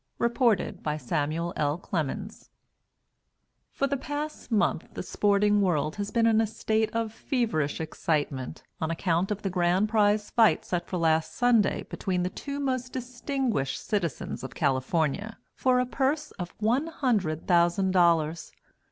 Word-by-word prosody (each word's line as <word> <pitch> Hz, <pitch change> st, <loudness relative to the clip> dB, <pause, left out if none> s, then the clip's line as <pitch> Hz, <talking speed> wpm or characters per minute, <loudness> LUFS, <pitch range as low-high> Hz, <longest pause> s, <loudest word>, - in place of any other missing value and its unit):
_ -, -, -50 dB
REPORTED 235 Hz, -5 st, +1 dB
BY 150 Hz, 0 st, -2 dB
SAMUEL 155 Hz, +5 st, -2 dB
L. 145 Hz, +1 st, 0 dB
CLEMENS 185 Hz, +5 st, -4 dB, 1.2 s
For 275 Hz, -, 0 dB
the 280 Hz, 0 st, 0 dB
past 290 Hz, 0 st, -5 dB
month 215 Hz, -, +1 dB
the -, -, -4 dB
sporting 205 Hz, 0 st, +2 dB
world 155 Hz, -4 st, 0 dB
has 205 Hz, -1 st, -3 dB
been 230 Hz, -1 st, +2 dB
in 225 Hz, -1 st, +4 dB
a 225 Hz, -, +1 dB
state 220 Hz, 0 st, 0 dB
of 225 Hz, -1 st, -2 dB
feverish 225 Hz, -, -1 dB
excitement 150 Hz, -3 st, -2 dB, 0.2 s
on 160 Hz, -, -1 dB
account 170 Hz, +2 st, 0 dB
of 210 Hz, -1 st, -3 dB
the 195 Hz, -, 0 dB
grand 180 Hz, +3 st, +2 dB
prize 210 Hz, -1 st, +2 dB
fight 225 Hz, -2 st, +4 dB
set 175 Hz, -1 st, -2 dB
for 185 Hz, -, -3 dB
last 160 Hz, -1 st, +1 dB
Sunday 240 Hz, -4 st, +3 dB
between 180 Hz, -2 st, -2 dB
the 180 Hz, -, -2 dB
two 280 Hz, +6 st, -5 dB
most 255 Hz, -2 st, -2 dB
distinguished 250 Hz, -, -2 dB
citizens 175 Hz, -12 st, -2 dB
of 130 Hz, -3 st, -7 dB
California, 155 Hz, -, 0 dB, 0.2 s
for 255 Hz, -1 st, +2 dB
a 250 Hz, -, +2 dB
purse 280 Hz, +4 st, -1 dB
of 175 Hz, -1 st, -7 dB
one 240 Hz, +8 st, +1 dB
hundred 210 Hz, -, -1 dB
thousand 175 Hz, +2 st, +3 dB
dollars. 170 Hz, -3 st, +2 dB
200 Hz, 150 wpm, -27 LUFS, 165-235 Hz, 1.2 s, in